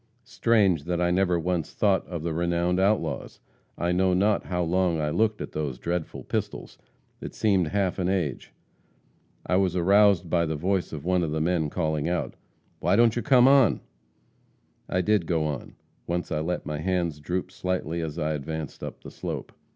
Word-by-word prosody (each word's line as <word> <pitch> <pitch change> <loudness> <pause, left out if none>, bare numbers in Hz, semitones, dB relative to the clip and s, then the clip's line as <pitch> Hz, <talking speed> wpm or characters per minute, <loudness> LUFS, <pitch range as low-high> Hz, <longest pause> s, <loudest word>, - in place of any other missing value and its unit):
Strange 100 -10 +2
that 85 0 -1
I 90 0 +2
never 90 -1 +2
once 85 -2 -2
thought 100 -3 +2
of 85 -3 -5
the 85 -1 -2
renowned 85 +2 0
outlaws! 95 -8 0 0.4
I 85 +1 0
know 90 +1 +2
not 100 +3 +2
how 90 -1 -1
long 85 -1 +1
I 75 -1 -1
looked 110 +4 +1
at - - -5
those 75 -5 -3
dreadful 85 +2 -4
pistols; - - -4 0.4
it - - -7
seemed 95 -6 +2
half 95 +2 -1
an 90 0 0
age. 90 -8 -2 0.9
I 90 - +2
was 95 -2 +1
aroused 95 0 +4
by 85 0 +1
the 80 - -2
voice 90 +4 -1
of 75 -1 -7
one 90 0 +2
of 80 - -1
the 80 +1 -2
men 80 -1 0
calling 80 -1 -1
out, 90 0 -2 0.5
"'Why - - +2
don't 115 0 +4
you 120 - -1
come 130 -2 +5
on?' 135 -5 +5 1.1
"I 90 - +1
did 105 -4 +1
go 80 -3 +1
on. 75 -3 -5 0.3
Once 85 +1 -2
I 75 - 0
let 85 +3 -3
my 75 -1 -4
hands 85 -3 -1
droop 90 +5 -3
slightly, 85 -2 -2
as 80 -2 -5
I 75 +1 -1
advanced 75 0 -5
up - - -7
the - - -9
slope. - - -5
90 Hz, 185 wpm, -26 LUFS, 80-95 Hz, 1.1 s, come